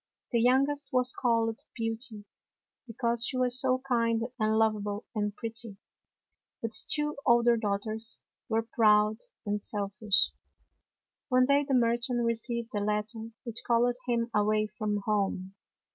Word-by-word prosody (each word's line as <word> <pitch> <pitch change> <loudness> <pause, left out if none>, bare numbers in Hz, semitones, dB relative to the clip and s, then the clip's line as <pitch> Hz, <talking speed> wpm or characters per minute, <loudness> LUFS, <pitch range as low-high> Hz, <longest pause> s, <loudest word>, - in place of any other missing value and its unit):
The 235 -2 +2
youngest 275 +4 +2
was 250 -1 +2
called 230 -2 +1 0.2
Beauty 225 -2 -4 0.6
because 235 0 0
she 255 - 0
was 250 0 +3
so 255 -1 +1
kind 230 -2 +1 0.2
and 215 0 +2
lovable 210 -1 0
and 210 -2 -2
pretty. 230 -2 -5 0.8
But 230 - -3
the - - -1
two 295 -1 0
older 235 0 +5
daughters 220 +1 -3 0.3
were 225 +1 +1
proud 215 -1 +3 0.3
and 205 0 -1
selfish. 205 0 +1 1.0
One 255 -1 +4
day 280 +2 +3
the 275 -2 +1
merchant 240 0 +1
received 230 +1 -2
a 205 - 0
letter 215 +2 -2
which 235 -3 -4
called 240 +1 +2
him 235 -1 0
away 215 +1 +2
from 210 -1 -2
home. 195 -3 -1
230 Hz, 135 wpm, -29 LUFS, 215-245 Hz, 1.0 s, older